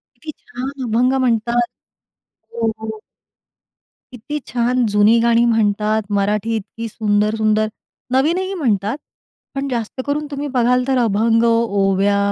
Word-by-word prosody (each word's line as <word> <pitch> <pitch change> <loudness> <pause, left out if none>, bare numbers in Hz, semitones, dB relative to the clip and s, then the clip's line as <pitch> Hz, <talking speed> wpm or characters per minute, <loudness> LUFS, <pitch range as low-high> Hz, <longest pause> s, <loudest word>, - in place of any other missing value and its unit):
किती 315 - -8
छान 255 +2 -6 0.2
अभंग 245 +3 +2
म्हणतात. 240 -1 +1 0.9
हो, 225 -1 0
हो. 220 -1 -6 1.1
किती 285 +5 -5
छान 245 +1 +1
जुनी 210 +3 +4
गाणी 235 0 +3
म्हणतात 215 -1 +1 0.2
मराठी 210 +3 0
इतकी 225 +2 -6
सुंदर-सुंदर, 215 0 +1 0.5
नवीनही 345 +9 +1
म्हणतात 220 - 0 0.6
पण 275 0 -2
जास्त 235 0 -3
करून 295 +1 -1
तुम्ही 285 0 -4
बघाल 250 0 +3
तर 265 -1 +2
अभंग, 225 0 +2
ओव्या 200 -3 +2
230 Hz, 115 wpm, -19 LUFS, 215-250 Hz, 1.1 s, जुनी